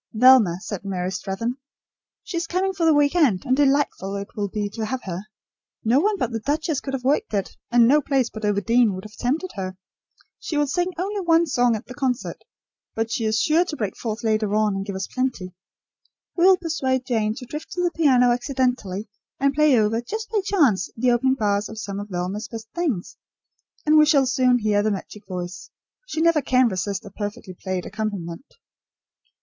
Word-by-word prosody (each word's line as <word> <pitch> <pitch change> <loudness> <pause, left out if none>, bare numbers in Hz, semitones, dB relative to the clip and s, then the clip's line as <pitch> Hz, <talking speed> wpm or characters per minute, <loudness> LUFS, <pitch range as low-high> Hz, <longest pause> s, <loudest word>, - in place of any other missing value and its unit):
"Velma," 230 -7 +6
said 200 -2 -6
Mary 185 -2 -3
Strathern. 195 +6 -3 0.7
"She 415 - -7
is 335 0 -2
coming 380 +2 0
for 340 -3 +1
the 320 - +6
week 290 0 +3
end, 265 - +3
and 255 -1 +2
delightful 275 -8 +1
it 200 0 -5
will 205 -1 -1
be 205 +1 -3
to 220 +1 -4
have 255 +2 -3
her. 180 -2 -4 0.6
No 235 +5 +4
one 410 +5 +1
but 250 -9 -1
the 225 - -2
duchess 295 +4 -1
could 270 -1 -3
have 255 - -5
worked 270 -4 +1
it, 195 -2 -2
and 240 -1 +5
no 295 +4 +5
place 270 -3 +1
but 220 - -9
Overdene 210 +1 +2
would 185 - -7
have 215 0 -11
tempted 300 +11 -1
her. 185 -1 -5 0.6
She 305 - -4
will 295 - +3
sing 350 +5 0
only 400 +4 -2
one 335 -1 +4
song 245 -6 +2
at 220 - -6
the 250 - -9
concert; 260 -2 -2 0.5
but 225 0 -2
she 230 - -1
is 220 0 +1
sure 315 +9 +3
to 330 - -5
break 210 -8 -3
forth 220 -1 -5
later 215 -2 +1
on, 215 -1 +2
and 195 - -2
give 200 - -4
us 190 - -3
plenty. 255 -9 -3 0.8
We 345 - +3
will 380 0 +7
persuade 265 -7 -1
Jane 220 -4 0
to 250 - -8
drift 300 +5 -7
to 360 - -1
the 350 - +1
piano 255 -7 +4
accidentally 245 -6 -1 0.3
and 275 0 +2
play 300 -3 +4
over, 220 +1 +2
just 440 - -6
by 430 -3 +1
chance, 275 - +2
the 250 +2 +3
opening 260 +2 +2
bars 205 -3 0
of 220 - -9
some 200 -2 -5
of 205 +1 -7
Velma's 185 +4 -3
best 225 -1 -8
things, 295 - -2 0.7
and 305 0 +6
we 305 - +6
shall 285 -4 +4
soon 255 -1 +3
hear 210 -3 +1
the 215 - +1
magic 205 +1 -6
voice. 180 -1 -6 0.4
She 320 - -2
never 335 -2 +4
can 255 -2 +3
resist 200 +2 -3
a 200 - -10
perfectly 205 -2 -6
played 185 0 -4
accompaniment." 200 - -5
240 Hz, 205 wpm, -23 LUFS, 205-290 Hz, 0.8 s, will